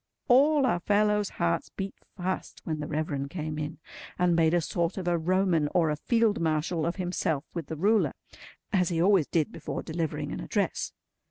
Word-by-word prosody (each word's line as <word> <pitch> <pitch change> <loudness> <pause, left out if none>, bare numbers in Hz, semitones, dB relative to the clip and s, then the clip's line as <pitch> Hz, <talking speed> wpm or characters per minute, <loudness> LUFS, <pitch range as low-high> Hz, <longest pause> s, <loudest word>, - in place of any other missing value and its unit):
All 280 +3 +5
our 225 -9 +2
fellows' 210 +2 +2
hearts 170 -1 0
beat 195 0 -5 0.2
fast 185 0 -3
when 155 -2 -3
the 150 - -4
Reverend 145 -3 -2
came 155 -2 -4
in, 150 +1 -4 0.4
and 180 -1 +3
made 165 0 +4
a - - +4
sort 170 +2 -1
of 185 -2 -4
a 175 - +3
Roman, 170 -2 +2
or 165 -3 +3
a - - 0
Field 225 +6 +2
Marshal, 160 +1 0
of 170 - -1
himself 175 -5 -1
with 170 -5 -4
the 160 - -5
ruler; 210 +6 +3 0.6
as 180 -3 +3
he 170 -2 -1
always 185 -3 +4
did 160 -3 0
before 155 - -5
delivering 160 -1 -3
an - - -4
address. - - -1
170 Hz, 185 wpm, -28 LUFS, 155-190 Hz, 0.6 s, All